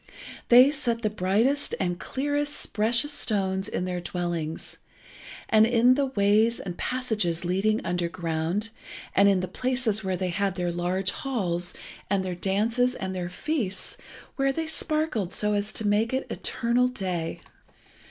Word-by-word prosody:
They 250 Hz, +3 st, +8 dB
set 240 Hz, -6 st, -2 dB
the 215 Hz, -, +1 dB
brightest 215 Hz, +9 st, +1 dB
and 175 Hz, -2 st, -1 dB
clearest 290 Hz, +2 st, -2 dB
precious 235 Hz, +7 st, +2 dB
stones 190 Hz, -6 st, 0 dB
in -, -, -2 dB
their 180 Hz, -1 st, -3 dB
dwellings, 175 Hz, -3 st, -4 dB, 0.7 s
and 220 Hz, 0 st, +5 dB
in 240 Hz, +1 st, +5 dB
the 280 Hz, +1 st, +1 dB
ways 220 Hz, -1 st, +3 dB
and 180 Hz, -3 st, -5 dB
passages 210 Hz, -9 st, -1 dB
leading 200 Hz, +5 st, +1 dB
underground, 170 Hz, +3 st, -1 dB, 0.4 s
and 200 Hz, +1 st, +6 dB
in 190 Hz, -2 st, +3 dB
the 185 Hz, -, -3 dB
places 245 Hz, 0 st, 0 dB
where 190 Hz, -1 st, -1 dB
they 185 Hz, 0 st, -1 dB
had 195 Hz, +1 st, -1 dB
their 175 Hz, -1 st, -1 dB
large 180 Hz, +2 st, 0 dB
halls, 180 Hz, -10 st, -2 dB, 0.3 s
and 195 Hz, -1 st, +1 dB
their 185 Hz, -, -2 dB
dances 225 Hz, +8 st, +1 dB
and 190 Hz, 0 st, -4 dB
their 180 Hz, -1 st, -3 dB
feasts, 200 Hz, -, -3 dB, 0.4 s
where 275 Hz, 0 st, +2 dB
they 320 Hz, +4 st, -2 dB
sparkled 305 Hz, -, -1 dB
so 210 Hz, 0 st, 0 dB
as 205 Hz, 0 st, -1 dB
to 220 Hz, -, -3 dB
make 210 Hz, +4 st, +2 dB
it 265 Hz, -, 0 dB
eternal 240 Hz, +1 st, +1 dB
day. 185 Hz, -9 st, -3 dB
205 Hz, 150 wpm, -26 LUFS, 180-250 Hz, 0.7 s, They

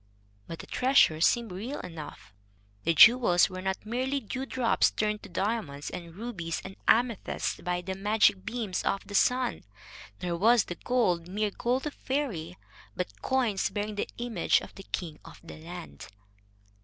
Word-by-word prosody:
But 165 Hz, -, -6 dB
the -, -, -9 dB
treasure 250 Hz, -, +3 dB
seemed 235 Hz, +4 st, +3 dB
real 225 Hz, +10 st, -5 dB
enough. 155 Hz, -, -9 dB, 0.5 s
The 165 Hz, 0 st, +2 dB
jewels 210 Hz, -3 st, +7 dB
were 185 Hz, 0 st, -6 dB
not 190 Hz, +2 st, -3 dB
merely 260 Hz, +5 st, -1 dB
dewdrops 260 Hz, 0 st, +1 dB
turned 210 Hz, 0 st, -1 dB
to 205 Hz, -, -11 dB
diamonds 175 Hz, -7 st, -2 dB
and 170 Hz, -2 st, -8 dB
rubies 190 Hz, -7 st, -4 dB
and 190 Hz, 0 st, -8 dB
amethysts 235 Hz, -2 st, +1 dB
by 180 Hz, 0 st, -1 dB
the 190 Hz, +2 st, -4 dB
magic 200 Hz, -1 st, +2 dB
beams 220 Hz, -4 st, -3 dB
of 195 Hz, -, -1 dB
the 205 Hz, -, -10 dB
sun, 250 Hz, +4 st, +2 dB, 0.6 s
nor 175 Hz, -1 st, -2 dB
was 225 Hz, +4 st, +5 dB
the -, -, -5 dB
gold 180 Hz, -7 st, 0 dB
mere 205 Hz, +3 st, -1 dB
gold 250 Hz, +6 st, -1 dB
of 300 Hz, -, -3 dB
faerie, 200 Hz, -, -3 dB, 0.4 s
but 180 Hz, -, -5 dB
coins 245 Hz, -7 st, +1 dB
bearing 210 Hz, 0 st, -3 dB
the 205 Hz, -, -3 dB
image 240 Hz, -1 st, +1 dB
of -, -, -11 dB
the 195 Hz, -, -12 dB
king 160 Hz, -4 st, -4 dB
of -, -, -13 dB
the 170 Hz, -, -10 dB
land. 170 Hz, +1 st, -9 dB
205 Hz, 160 wpm, -29 LUFS, 175-240 Hz, 0.6 s, jewels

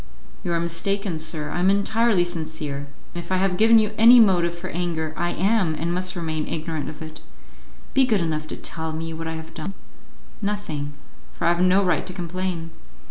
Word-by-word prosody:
"You 175 Hz, -, -2 dB
are 170 Hz, -, +1 dB
mistaken, 170 Hz, +1 st, -1 dB
sir, 155 Hz, -1 st, -2 dB
I -, -, -2 dB
am 185 Hz, +2 st, +4 dB
entirely 200 Hz, 0 st, +3 dB
sincere; 160 Hz, -4 st, -4 dB, 0.3 s
and 175 Hz, -, -5 dB
if -, -, -11 dB
I 185 Hz, -, +3 dB
have 190 Hz, -1 st, +1 dB
given 225 Hz, +4 st, +6 dB
you 215 Hz, -1 st, +3 dB
any 240 Hz, +2 st, +9 dB
motive 175 Hz, -5 st, +4 dB
for 185 Hz, +2 st, -6 dB
anger, 165 Hz, -2 st, -2 dB
I 175 Hz, -, -1 dB
am, 190 Hz, -3 st, +1 dB
and 170 Hz, +3 st, -2 dB
must 185 Hz, +1 st, -1 dB
remain, 160 Hz, -3 st, -2 dB
ignorant 160 Hz, -2 st, -3 dB
of 155 Hz, +1 st, -8 dB
it. 155 Hz, 0 st, -10 dB, 0.7 s
Be 265 Hz, -1 st, +4 dB
good 220 Hz, -5 st, +3 dB
enough 155 Hz, -2 st, -2 dB
to -, -, -6 dB
tell 160 Hz, -1 st, -4 dB
me 165 Hz, +1 st, -4 dB
what 165 Hz, 0 st, -5 dB
I 160 Hz, -, -3 dB
have 160 Hz, 0 st, -8 dB
done." 175 Hz, +4 st, -6 dB, 0.7 s
"Nothing, 160 Hz, -9 st, -3 dB, 0.4 s
for -, -, -4 dB
I -, -, +5 dB
have 175 Hz, +1 st, +2 dB
no 185 Hz, +2 st, +4 dB
right 180 Hz, -, +1 dB
to 185 Hz, -, -5 dB
complain." 175 Hz, -2 st, -4 dB
175 Hz, 200 wpm, -24 LUFS, 160-195 Hz, 0.7 s, any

